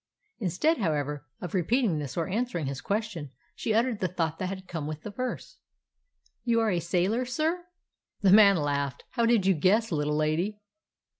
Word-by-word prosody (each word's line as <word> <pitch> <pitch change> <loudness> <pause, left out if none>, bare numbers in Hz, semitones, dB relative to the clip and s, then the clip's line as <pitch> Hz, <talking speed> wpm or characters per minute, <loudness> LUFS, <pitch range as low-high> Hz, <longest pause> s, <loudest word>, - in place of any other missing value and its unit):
Instead, 240 - +1
however, 150 -5 -1
of 180 - -6
repeating 195 - +1
this 145 0 -5
or 165 - +1
an 220 +6 0
swering 170 -10 -3
his 135 0 -4
question, 200 -8 -2 0.2
she - - -3
uttered 225 0 +2
the 185 - +1
thought 165 -3 -2
that 185 - -1
had 190 -1 -7
come 160 -4 -4
with 155 0 -6
the 210 - -6
verse: 250 +5 -5 0.8
"You 235 -2 +2
are 225 -2 +2
a 175 - +1
sailor, 180 +8 +1
sir?" 320 +7 -1 0.6
The 190 - +6
man 200 -2 +8
laughed. 140 -2 -1
"How 235 -2 +1
did 230 -5 +3
you 195 - +5
guess, 200 +8 +2
little 150 -1 0
lady?" 165 +7 0
185 Hz, 180 wpm, -28 LUFS, 155-225 Hz, 0.8 s, man